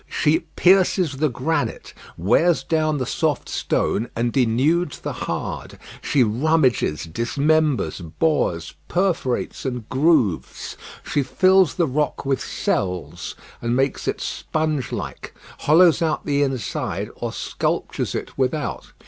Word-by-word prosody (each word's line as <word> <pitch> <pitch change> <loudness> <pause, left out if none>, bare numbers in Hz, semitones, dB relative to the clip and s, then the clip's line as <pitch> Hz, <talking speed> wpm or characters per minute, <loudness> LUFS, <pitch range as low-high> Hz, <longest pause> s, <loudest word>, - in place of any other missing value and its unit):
She 155 +2 +2 0.2
pierces 185 -5 +3
the 155 +2 +2
granite, 130 +7 -2 0.2
wears 155 - +3
down 155 -2 +1
the 130 - -1
soft 160 +3 -1
stone, 115 +3 -1
and 120 +1 0
denudes 140 +6 +2
the - - -4
hard; - - -4 0.2
she 140 -4 +3
rummages, 125 - +2
dismembers, 140 - +1 0.2
bores, 85 - +1
perforates, 175 -8 -1
and 125 -4 -4
grooves; 130 - +1 0.3
she 145 - 0
fills 185 +6 +4
the 175 - +2
rock 145 0 -1
with 135 -1 0
cells, 85 -3 -2 0.3
and 120 +1 0
makes 135 +1 0
it - - -1
sponge 155 -5 -2
like, - - -6 0.2
hollows 165 +2 +5
out 160 -2 0
the 145 -1 +1
inside, 130 -8 -2
or - - -3
sculptures - - -2
it - - -5
without. 130 +1 -2
140 Hz, 125 wpm, -22 LUFS, 120-160 Hz, 0.3 s, hollows